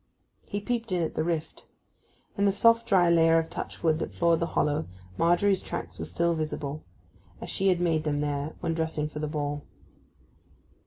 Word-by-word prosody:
He 205 - -3
peeped 230 0 -3
in 180 -2 +1
at 160 - -2
the 155 - -1
rift. 165 -1 -3 0.7
In 200 - +1
the 200 - +4
soft 230 +3 +4
dry 190 -6 +4
layer 165 -1 +5
of 165 0 -1
touch - - -6
wood 160 -2 +3
that - - -5
floored 170 -1 +3
the 170 - 0
hollow 150 +1 +1 0.3
Margery's 175 - +3
tracks - - -6
were - - -3
still 170 0 0
visible, 155 -2 -4 0.6
as - - -6
she 195 - 0
had 180 -2 +3
made 165 -3 +1
them 145 -2 -1
there 145 +1 -2
when 165 - -1
dressing 160 -2 -1
for 150 0 -7
the 150 - -2
ball. 145 -1 -3
165 Hz, 190 wpm, -27 LUFS, 155-180 Hz, 0.7 s, layer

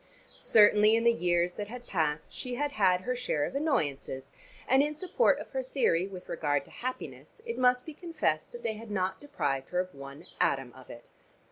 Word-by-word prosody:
Certainly 210 0 +5
in 230 - +1
the 235 0 +5
years 175 -3 +1
that 205 +2 -5
had 245 +2 -9
passed 155 -6 -1
she 250 -1 -4
had 290 +3 -1
had 185 -7 +3
her 250 +6 -2
share 240 -12 -1
of - - -6
annoyances, 140 - -1 0.4
and 265 +1 +5
in 300 +1 0
support 370 +9 +2
of - - -9
her 265 - -1
theory 235 -9 +1
with 185 -2 -10
regard 145 -4 0
to - - -18
happiness 255 - -7
it 465 - -4
must 250 0 +3
be 315 - -7
confessed 320 - -2
that 240 - -10
they 225 - -1
had 220 +1 -10
not 190 -2 -1
deprived 140 - -2
her 180 - 0
of 185 0 -2
one 140 +1 -10 0.2
atom 135 -3 +1
of 130 -1 -15
it. 120 - -11
205 Hz, 205 wpm, -30 LUFS, 155-250 Hz, 0.4 s, Certainly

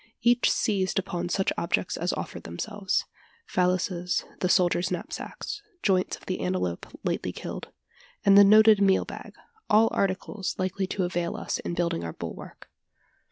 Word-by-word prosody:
Each 240 +1 +4
seized 195 -2 0
upon 175 -2 -2
such 195 +1 +1
objects 170 - 0
as - - -1
offered - - -5
themselves 195 - -2 0.5
valises, 180 0 0
the 180 - 0
soldiers' 180 -1 +3
knapsacks, 185 - -5 0.2
joints 185 -2 +1
of - - -19
the 185 - -3
antelope 135 - -2 0.2
lately - - -1
killed, - - -7 0.6
and 195 - +7
the 200 - +10
noted 215 +1 +7
meal 195 -1 +4
bag - - -9 0.3
all 220 +1 +5
articles 195 0 -1
likely 185 +1 -1
to 190 - -2
avail 175 -1 -2
us - - -3
in 175 - -4
building 170 - -1
our 85 - -5
bulwark. - - -8
185 Hz, 150 wpm, -27 LUFS, 175-200 Hz, 0.6 s, the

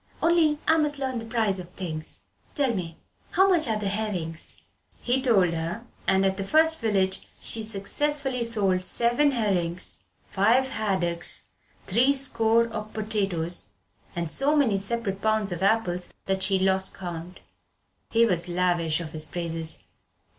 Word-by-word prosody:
"Only 330 -3 +3
I 320 - +5
must 300 -2 +1
learn 260 -3 -2
the 225 - -8
prices 220 -4 0
of 175 -1 -8
things. 160 -4 -4 0.3
Tell 275 -5 +1
me. 170 -5 -5 0.4
How 380 +1 +5
much 345 -5 +2
are 220 -1 0
the 210 -1 -3
herrings?" 195 -6 -3 0.4
He 250 +2 0
told 195 -9 +3
her 170 +8 -4 0.2
and 190 0 +3
at 190 0 0
the 195 - -2
first 320 +8 +3
village 195 -4 0
she 225 - +3
successfully 250 +5 -1
sold 200 -5 +1
seven 240 +9 +2
herrings, 185 -8 -1 0.3
five 240 +7 +2
haddocks, 185 -7 -1 0.4
three 250 +8 +3
score 230 -4 +2
of 215 -1 -6
potatoes, 195 - 0 0.4
and 170 -2 -3
so 285 +3 +4
many 235 -10 +2
separate 200 -1 -3
pounds 215 -2 +1
of 175 - -4
apples 190 -3 +1 0.2
that 190 0 -1
she 190 0 +3
lost 190 0 +1
count. 175 -1 -7 0.7
He 230 0 +4
was 180 -4 0
lavish 175 -2 +1
of 160 -2 -7
his 155 -1 -1
praises. 165 -2 -4
200 Hz, 150 wpm, -26 LUFS, 180-235 Hz, 0.7 s, I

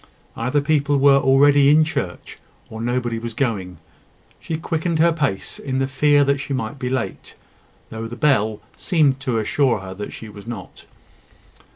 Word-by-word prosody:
Either 130 +5 0
people 145 -1 +1
were 140 0 +5
already 140 +1 +5
all 150 - +6
in 155 - +5
church, 125 - -5 0.3
or 110 0 -7
nobody 120 -1 -1
was 115 -1 -6
going. 100 -9 -2 0.6
She 160 - -4
quickened 165 +1 -2
her 170 +2 +4
pace 140 -12 -3
in 130 -2 -3
the 135 - +1
fear 145 +2 +3
that 140 0 +1
she 140 0 -3
might 130 +3 -4
be 125 -1 -2
late, 130 0 -4 0.6
though 110 0 -5
the 120 - -8
bell 110 -7 +1
seemed 150 -7 +1
to 130 -3 -2
assure 115 0 +1
her 95 0 -8
that 105 +2 -7
she 110 - -9
was 100 0 -12
not. 120 -1 -9
135 Hz, 175 wpm, -21 LUFS, 115-145 Hz, 0.6 s, all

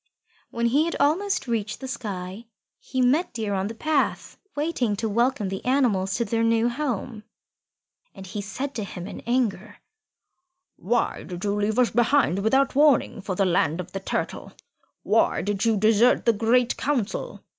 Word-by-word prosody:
When 235 0 -2
he 280 +7 +3
had 335 - -2
almost 330 +5 +1
reached 220 -4 -2
the 265 - -6
sky, 205 -4 -6 0.3
he 260 0 -3
met 270 +5 +2
Deer 215 -3 -2
on 190 0 -1
the 225 - -7
path 305 +4 -1 0.2
waiting 290 -8 0
to 220 +3 -2
welcome 235 -1 +1
the 190 0 -5
animals 225 -8 +1
to 235 - 0
their 225 +2 -1
new 230 +1 +2
home. 240 -4 -4 0.9
And 195 -1 -9
he 205 +3 -5
said 255 +8 -5
to 220 - -3
him 180 -2 -7
in - - -7
anger, 215 -5 -1 1.0
"Why 230 +6 -1
did 180 -1 -8
you 200 -1 0
leave 210 +2 -1
us 250 -2 +3
behind, 240 -4 +2
without 265 +7 +2
warning, 280 -6 +3
for 190 -1 -4
the 195 - +2
land 170 -2 +1
of 180 0 -6
the 195 - -4
Turtle? 190 - -4 0.5
Why - - +2
did 205 +1 -1
you 225 -2 +3
desert 220 +4 +3
the 230 - +4
Great 235 +3 +2
Council? 255 -7 -2
230 Hz, 170 wpm, -24 LUFS, 200-255 Hz, 1.0 s, the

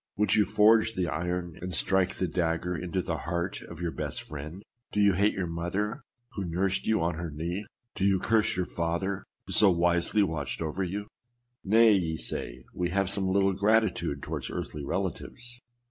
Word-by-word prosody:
Would 105 +1 +3
you 105 - +5
forge 110 +2 +4
the 90 -2 0
iron 85 +2 -3
and 90 0 -4
strike 95 -1 +2
the 95 - -1
dagger 85 +1 -1
into 90 +2 -2
the 80 - -2
heart 85 +3 -3
of 85 0 -10
your 85 -1 -1
best - - -4
friend? 75 +6 -8 0.3
Do 105 - -1
you 100 -1 +5
hate 100 +4 +2
your 95 - -1
mother, 95 - -2 0.3
who 100 - -4
nursed 95 +3 0
you 110 - +3
on 85 +1 +1
her 85 -1 -3
knee? 85 +7 -4 0.3
Do 95 - -1
you 100 -1 +4
curse 110 -3 +2
your 90 - +1
father, 85 +4 -2 0.2
who - - -5
so 105 - +7
wisely 85 +3 +3
watched 80 -7 -3
over 80 +4 -2
you? 100 +3 -3 0.6
Nay, 110 +2 +6
ye 85 -5 0
say, 65 -4 -5
we 90 -1 -1
have 95 +1 +1
some 100 -1 0
little 95 +1 +3
gratitude 100 -8 +1
towards - - -4
earthly 75 - -5
relatives. 100 - -4
90 Hz, 185 wpm, -28 LUFS, 85-100 Hz, 0.6 s, so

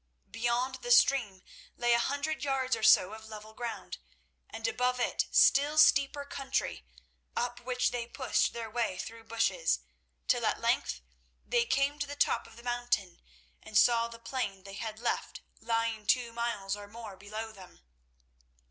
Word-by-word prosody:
Beyond 245 +3 -1
the 240 - -6
stream 240 -6 +4 0.3
lay 240 0 +3
a 235 - +4
hundred 285 +5 -1
yards 265 -3 +1
or 225 - -7
so 220 -3 +6
of 220 0 -10
level 215 0 -10
ground, 235 0 -6 0.5
and 225 0 -3
above 250 +2 0
it - - 0
still 290 +2 +4
steeper 285 -2 +5
country, 270 - -3 0.5
up 245 0 -2
which 250 0 0
they 240 -1 -3
pushed 260 +2 0
their 230 -1 -5
way 220 -4 -2
through 225 +4 -7
bushes, 225 - +1 0.5
till - - +2
at - - 0
length - - 0 0.4
they 235 -1 +2
came 280 +2 +1
to 290 - -2
the 285 - -6
top - - +1
of - - -16
the 235 - -13
mountain 240 -7 -1 0.4
and 215 -1 -2
saw 235 -1 +5
the 230 0 -10
plain 230 -5 -4
they 195 0 -10
had 220 +1 -5
left 245 - -3 0.2
lying 225 -2 -1
two 240 -2 +2
miles 230 -4 -2
or 205 0 -10
more 220 -1 -9
below 215 +3 -6
them. 190 - -15
235 Hz, 165 wpm, -31 LUFS, 220-255 Hz, 0.5 s, so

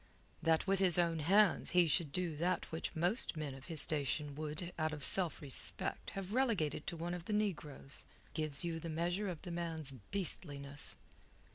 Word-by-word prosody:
That 160 0 +3
with 195 0 +2
his 185 -3 +3
own 170 -2 +2
hands 195 +5 +4
he 175 - +7
should 155 -1 +2
do 175 -1 -2
that 175 +2 -1
which 160 +2 -4
most 175 +3 +2
men 150 -3 -3
of 135 0 -11
his 160 -3 +4
station 145 0 +1
would, 155 +4 -5
out 155 0 0
of 145 -2 -5
self 180 -4 +4
respect, 135 -3 -3
have 195 +1 -4
relegated 210 - +1
to 170 - -3
one 170 +2 -3
of 175 -1 -6
the 210 - -2
negroes, 155 -9 -2 0.3
gives 155 -1 +2
you 165 -1 -2
the 165 - -6
measure 175 +5 -1
of 170 -4 -6
the 175 - -6
man's 165 -4 -3 0.2
beastliness. 145 -7 -3
165 Hz, 180 wpm, -36 LUFS, 150-180 Hz, 0.3 s, he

